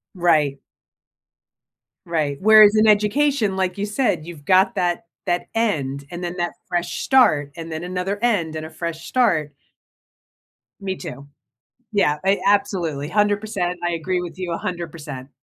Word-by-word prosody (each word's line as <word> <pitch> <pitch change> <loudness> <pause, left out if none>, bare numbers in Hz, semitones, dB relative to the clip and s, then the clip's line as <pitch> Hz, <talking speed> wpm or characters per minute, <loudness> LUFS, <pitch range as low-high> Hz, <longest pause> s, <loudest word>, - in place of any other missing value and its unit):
Right. 155 -6 +2 1.5
Right, 155 -4 -1
whereas 215 0 +7
in 215 0 +4
education, 210 +1 +2
like 185 -1 -1
you 200 - -1
said, 210 - 0
you've 165 -4 -11
got 190 +1 +4
that 175 -1 -1 0.2
that 175 -2 -1
end, 140 -12 -1
and 175 +1 -7
then 175 +1 -4
that 175 -1 -2
fresh 175 0 -2
start, 150 - +3
and 165 0 -7
then 160 +1 -4
another 180 +2 -3
end, 175 -10 +1
and 155 0 -5
a - - -8
fresh 165 0 -6
start. 165 - +1 1.3
Me 190 -1 -3
too. 140 -4 -9 0.6
Yeah, 175 -8 +2
I 195 +1 +3
absolutely. 175 -8 +1
100%, 205 -2 0
I 175 - -1
agree 180 +2 -1
with 175 0 -8
you 185 -2 -4
100%. 160 -6 -5
175 Hz, 145 wpm, -21 LUFS, 160-205 Hz, 1.5 s, whereas